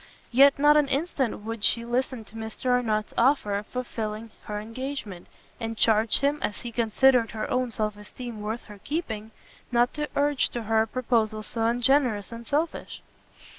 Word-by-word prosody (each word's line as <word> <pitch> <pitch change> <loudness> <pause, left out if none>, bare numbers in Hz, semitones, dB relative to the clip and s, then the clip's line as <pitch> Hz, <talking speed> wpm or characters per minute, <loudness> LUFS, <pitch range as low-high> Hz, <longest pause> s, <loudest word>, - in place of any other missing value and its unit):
Yet 275 +3 +6
not 295 +1 +6
an 295 -2 +3
instant 275 -5 -1
would 225 0 -6
she 235 +2 +3
listen 245 0 -1
to 210 - -16
Mr 225 +3 -3
Arnott's 220 -4 0
offer 240 -4 +3
of 205 +1 -2
fulfilling 225 -3 -5
her 210 0 -4
engagement, 225 -4 -6 0.3
and 225 -1 -4
charged 220 +1 +4
him, 285 +2 +1
as 205 - -3
he 240 - -6
considered 235 +1 +3
her 220 - -4
own 255 -1 +1
self 215 -2 -2
esteem 220 +2 -8
worth 220 +3 -4
her 210 -2 -13
keeping, 220 -9 -3 0.4
not 240 0 +3
to 300 -1 -3
urge 285 -1 +2
to 240 - -5
her 220 0 +2
a 220 - 0
proposal 225 -3 0
so 225 +1 -2
ungenerous 245 -3 +2
and 230 0 -9
selfish. 310 +4 -2
235 Hz, 170 wpm, -26 LUFS, 215-260 Hz, 0.4 s, Yet